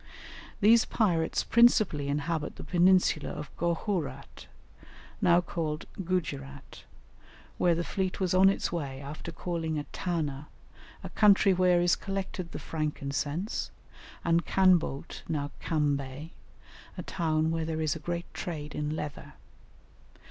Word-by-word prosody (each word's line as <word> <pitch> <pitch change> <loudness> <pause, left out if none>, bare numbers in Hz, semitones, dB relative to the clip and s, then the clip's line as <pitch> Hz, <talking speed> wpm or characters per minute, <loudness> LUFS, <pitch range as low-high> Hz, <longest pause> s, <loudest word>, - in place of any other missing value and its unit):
These 225 +3 +6
pirates 170 -8 +1
principally 215 -11 +4
inhabit 150 +2 -2
the - - -9
peninsula 180 -3 +3
of 150 0 -7
Gohourat, 165 - -3 0.7
now 175 0 +5
called 160 -3 -3 0.2
Gujerat, 140 -6 -4 0.7
where 175 -2 +4
the 170 - -1
fleet 190 +1 -2
was 185 -2 0
on 190 +1 +6
its 195 - -1
way 140 -6 -4
after 145 +4 -7
calling 165 0 -3
at 145 - -6
Tana 150 -5 -2 0.6
a - - -6
country 200 -2 +5
where 180 -1 +3
is 175 - +4
collected 190 -3 -5
the - - -5
frankincense 150 +4 -3 0.6
and 170 0 +3
Canboat, 180 -7 +2
now 145 -3 -2
Kambay, 145 -1 -1 0.7
a - - -4
town 160 -2 0
where 165 0 -1
there 160 0 -3
is 155 -1 0
a - - -6
great 170 +2 -3
trade 150 -4 -5
in 150 +1 -2
leather. 150 -2 -6
165 Hz, 125 wpm, -29 LUFS, 150-180 Hz, 0.7 s, These